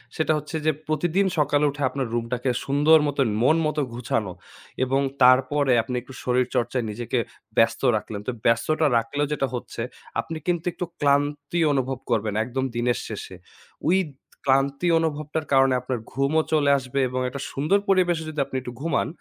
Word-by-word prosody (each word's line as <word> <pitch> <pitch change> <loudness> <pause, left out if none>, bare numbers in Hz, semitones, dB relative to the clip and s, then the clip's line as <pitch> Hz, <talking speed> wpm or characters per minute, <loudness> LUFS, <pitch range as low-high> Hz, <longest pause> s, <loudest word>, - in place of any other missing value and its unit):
সেটা 160 0 +1
হচ্ছে 150 +2 -6
যে 155 - +5 0.2
প্রতিদিন 175 +5 +1
সকালে 145 0 +3
উঠে 145 +1 -7
আপনার 130 -1 -3
রুমটাকে 120 +2 -1 0.2
সুন্দর 150 +3 +5
মতন, 140 -2 +1 0.2
মন 155 +5 +5
মতো 155 -1 0
গুছানো 115 -5 -2 0.5
এবং 135 +2 +1 0.2
তারপরে 130 +1 +4
আপনি 125 0 -4
একটু 130 +2 -13
শরীরচর্চায় 125 -1 0
নিজেকে 120 +3 -2 0.4
ব্যস্ত 115 - +3
রাখলেন। 105 -1 -4
তো 125 - +1
ব্যস্ততা 155 +7 +2
রাখলেও 145 +6 -1
যেটা 135 -2 0
হচ্ছে। 120 -1 -5 0.4
আপনি 165 - -6
কিন্তু 175 -2 0
একটু 180 - -4
ক্লান্তি 145 +3 +1
অনুভব 130 -1 -1
করবেন 110 -3 0
একদম 130 +3 -2
দিনের 120 +1 +1
শেষে। 105 -3 -7 0.5
ওই 185 - +5 0.5
ক্লান্তি 140 +4 +2
অনুভবটার 155 -1 -2
কারণে 135 -1 +5
আপনার 125 -2 -3
ঘুমও 140 +4 +2
চলে 145 -2 +3
আসবে 130 +1 -3
এবং 130 0 -2
একটা 140 +1 -6
সুন্দর 155 +9 +2
পরিবেশে 175 -4 +3
যদি 155 -1 -5
আপনি - - -9
একটু 125 -1 -7
ঘুমান, 160 -3 0
135 Hz, 160 wpm, -24 LUFS, 125-155 Hz, 0.5 s, যে